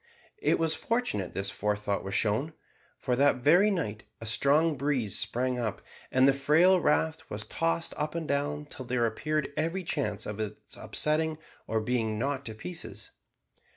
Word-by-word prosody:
It 430 - +2
was 165 -1 +2
fortunate 230 - -2
this 95 0 -2
forethought 105 -1 -1
was 95 - -3
shown, 115 +9 +1 0.4
for 125 -2 0
that 140 +2 +5
very 165 +11 +5
night 125 - -2 0.2
a 115 - -7
strong 140 +9 +3
breeze 130 -7 0
sprang 125 +1 0
up, 110 -5 -2 0.3
and 130 +1 +5
the 140 - +6
frail 160 +7 +5
raft 80 - +1
was - - -5
tossed 85 0 -1
up 150 +2 -2
and 165 -2 -3
down 145 +1 -1
till 130 -3 -9
there 120 -1 +1
appeared 150 +6 -1
every 165 +5 -1
chance 135 - -2
of 105 0 -5
its 105 -1 -6
upsetting 155 +1 0 0.3
or 110 - +1
being 110 -1 0
knocked 140 +3 -2
to 110 - -6
pieces. 110 - -8
135 Hz, 165 wpm, -29 LUFS, 110-155 Hz, 0.4 s, the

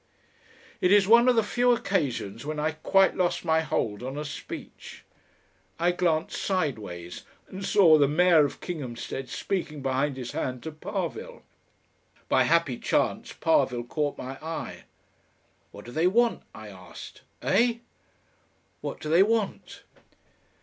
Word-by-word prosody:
It 180 - +3
is 200 -2 +5
one 235 +3 +6
of 250 - +4
the 225 - +3
few 245 +3 +2
occasions 135 - -2
when 155 +1 -4
I 155 +1 0
quite 190 +5 +3
lost 180 -1 0
my 160 -1 +3
hold 110 -8 -2
on 130 +3 -5
a 150 - -4
speech. 145 - -9 0.7
I 175 +2 +2
glanced 170 -3 0
sideways 105 - -3 0.3
and 190 +1 -8
saw 170 -7 +5
the 140 - +5
Mayor 165 +1 +5
of 145 - -3
Kinghamstead 135 -5 -5
speaking 155 -4 -3
behind 135 +1 0
his 125 -2 -5
hand 125 -1 -4
to 160 - -5
Parvill. 210 - -5 0.9
By - - +4
a - - +4
happy - - +2
chance - - 0
Parvill 130 - +1
caught 145 +4 -2
my 130 +1 -7
eye. 160 +1 -6 0.8
"What 100 - -12
do 120 - -9
they 160 +6 +2
want?" 235 +5 +2
I 110 -1 -9
asked. 95 -2 -12 0.2
"Eh?" 235 0 +3 1.1
"What - - -5
do - - -6
they 165 +4 +5
want?" 215 0 -1
160 Hz, 145 wpm, -27 LUFS, 130-195 Hz, 1.1 s, one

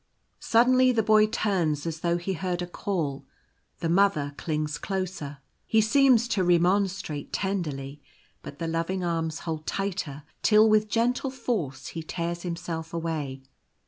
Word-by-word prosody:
Suddenly 255 +2 +4
the 225 -2 +2
Boy 215 0 +5
turns 180 -9 0
as 165 -1 -3
though 170 +1 +1
he 175 +3 -3
heard 180 0 -2
a - - -2
call. 175 -6 -3 0.5
The 165 - 0
Mother 170 -6 +2
clings 150 -1 -2
closer. 185 -7 -4 0.3
He 220 - +3
seems 240 +1 +4
to 195 -5 +1
remonstrate 180 -2 +1
tenderly; 150 -8 -3 0.4
but 140 - -9
the 165 - -3
loving 165 +3 -1
arms 165 -2 -2
hold 160 -2 -5
tighter, 180 -8 -3 0.2
till 215 0 +6
with 215 0 +3
gentle 245 +4 +1
force 210 - -3
he 165 - -5
tears 170 +1 -4
himself 170 -2 -5
away. 150 -5 -3
175 Hz, 145 wpm, -27 LUFS, 160-205 Hz, 0.5 s, till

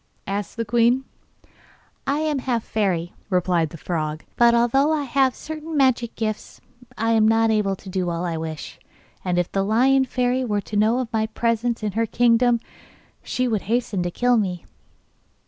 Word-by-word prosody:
asked 200 +3 -4
the 230 - -1
queen. 240 +4 +3 1.0
'I 280 +1 +1
am 305 -3 0
half 245 -3 -1
a - - -25
fairy,' 185 -5 -1 0.2
replied 180 -3 +1
the 165 - -10
frog; 155 -2 -3
'but, 235 0 +5
although 270 +6 +3
I 305 -2 0
have 265 -1 +2
certain 315 0 -6
magic 250 -4 +2
gifts, 215 -1 -4 0.4
I 225 +1 +1
am 220 -1 +4
not 225 0 +3
able 205 -3 +1
to 190 - -16
do 185 -1 -2
all 170 +1 -2
I 170 -2 -2
wish. 160 -2 -6 0.4
And 180 -1 -1
if 175 -1 0
the 195 - 0
Lion 260 +6 +3
Fairy 250 0 0
were 210 -4 -1
to 210 - -8
know 215 +3 +3
of 250 -2 -3
my 220 0 +1
presence 230 +1 -1
in 210 - -1
her 225 +3 0
kingdom 240 +1 +3 0.6
she 255 0 -1
would 220 -4 0
hasten 230 -5 0
to 175 - -1
kill 245 +6 +2
me. 185 -5 -2
225 Hz, 180 wpm, -23 LUFS, 195-245 Hz, 1.0 s, but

